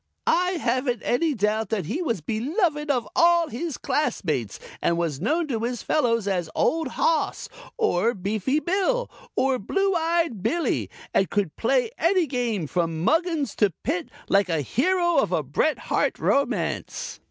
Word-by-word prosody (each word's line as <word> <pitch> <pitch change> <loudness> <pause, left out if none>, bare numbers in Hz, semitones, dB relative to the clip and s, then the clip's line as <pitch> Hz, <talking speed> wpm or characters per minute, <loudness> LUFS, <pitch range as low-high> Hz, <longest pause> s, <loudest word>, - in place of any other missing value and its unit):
I 360 +2 +2
haven't 255 - -1
any 300 +4 +1
doubt 215 0 0
that 205 -6 -1
he 270 - -2
was 230 - -1
beloved 295 - -1
of 245 -6 +1
all 340 -1 +4
his 300 +4 -4
classmates 155 - -1 0.2
and 170 - +1
was 165 -5 -2
known 325 +2 +1
to 230 -4 -1
his 240 +1 -3
fellows 230 -8 +1
as 180 -4 -1
Old 325 0 +1
Hoss, 485 +1 0 0.3
or 235 - +2
Beefy 215 +9 0
Bill 395 +9 0 0.2
or 265 -1 +2
Blue 390 - 0
eyed 330 - 0
Billie 325 - 0 0.2
and 195 - +2
could 200 -6 -1
play 470 - +1
any 355 +1 +3
game 240 - -1
from 165 0 -1
Muggins 325 - +1
to 210 - +4
Pit 330 +3 -2 0.2
like 200 -1 +3
a 165 -3 +1
hero 345 - +1
of 275 - +2
a - - +1
Bret - - +1
Harte - - 0
romance." 280 0 -1
260 Hz, 155 wpm, -25 LUFS, 205-335 Hz, 0.3 s, all